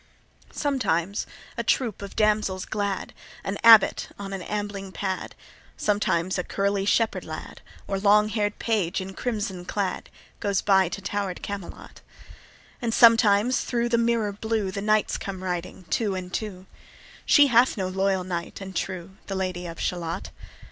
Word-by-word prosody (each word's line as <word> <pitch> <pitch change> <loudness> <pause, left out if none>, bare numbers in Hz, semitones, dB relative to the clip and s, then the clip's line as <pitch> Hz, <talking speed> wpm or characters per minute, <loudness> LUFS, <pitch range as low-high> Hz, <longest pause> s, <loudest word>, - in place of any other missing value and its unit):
Sometimes 205 - -1 0.3
a - - 0
troop 230 -7 0
of 200 - -8
damsels 210 -3 +1
glad, 200 -2 -3 0.3
An 195 +1 -3
abbot 225 -3 +7
on 195 -1 -6
an 195 - -4
ambling 205 0 -4
pad, 190 -1 -4 0.4
Sometimes 185 -3 +1
a - - -1
curly 200 +1 0
shepherd 225 +2 +1
lad, - - -8 0.3
Or 195 -1 -1
long 210 +1 +4
hair'd 210 -1 -1
page 205 -6 0
in 190 0 -6
crimson 205 -6 -3
clad, 195 +1 -3 0.3
Goes 200 -2 0
by 190 -3 +4
to 200 - -6
tower'd 200 -3 -3
Camelot; 200 -3 -7 0.8
And 230 -2 -1
sometimes 230 0 +5
thro' 240 -1 0
the 235 -1 +2
mirror 230 -3 +1
blue 215 -1 -1
The 200 - -4
knights 215 0 +1
come 190 -2 -6
riding 180 0 -4
two 210 -4 +1
and 180 -1 -6
two: 190 -4 -4 0.6
She 290 - +6
hath 240 +1 +5
no 190 -2 -1
loyal 190 0 0
knight 175 -2 -5
and 190 -1 -8
true, 190 +1 -4
The 195 - -3
Lady 185 -2 -3
of 165 0 -8
Shalott. 170 -2 -3
200 Hz, 155 wpm, -25 LUFS, 185-215 Hz, 0.8 s, abbot